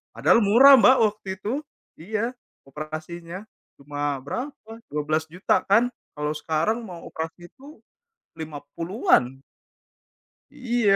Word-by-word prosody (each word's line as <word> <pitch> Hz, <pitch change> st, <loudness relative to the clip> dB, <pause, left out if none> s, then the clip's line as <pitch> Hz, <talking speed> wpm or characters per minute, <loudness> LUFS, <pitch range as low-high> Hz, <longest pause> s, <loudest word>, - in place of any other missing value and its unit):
Padahal 145 Hz, -, +4 dB
murah 255 Hz, +7 st, +8 dB
Mbak 255 Hz, +3 st, +7 dB
waktu 210 Hz, -1 st, -17 dB
itu. 215 Hz, +5 st, -2 dB, 0.5 s
Iya, 215 Hz, +8 st, -2 dB, 0.4 s
operasinya. 165 Hz, +6 st, -7 dB, 0.4 s
Cuma 145 Hz, 0 st, -3 dB
berapa, 235 Hz, -, -6 dB, 0.2 s
Rp12.000.000 155 Hz, +4 st, 0 dB
kan? 230 Hz, +5 st, +4 dB, 0.3 s
Kalau 150 Hz, +1 st, -2 dB
sekarang 165 Hz, +10 st, 0 dB
mau 175 Hz, -4 st, -9 dB
operasi 165 Hz, +2 st, -7 dB
itu 285 Hz, +4 st, -15 dB, 0.6 s
Rp50.000.000-an. 155 Hz, -, 0 dB, 1.1 s
Iya. 240 Hz, -5 st, +1 dB
175 Hz, 100 wpm, -24 LUFS, 155-220 Hz, 1.1 s, murah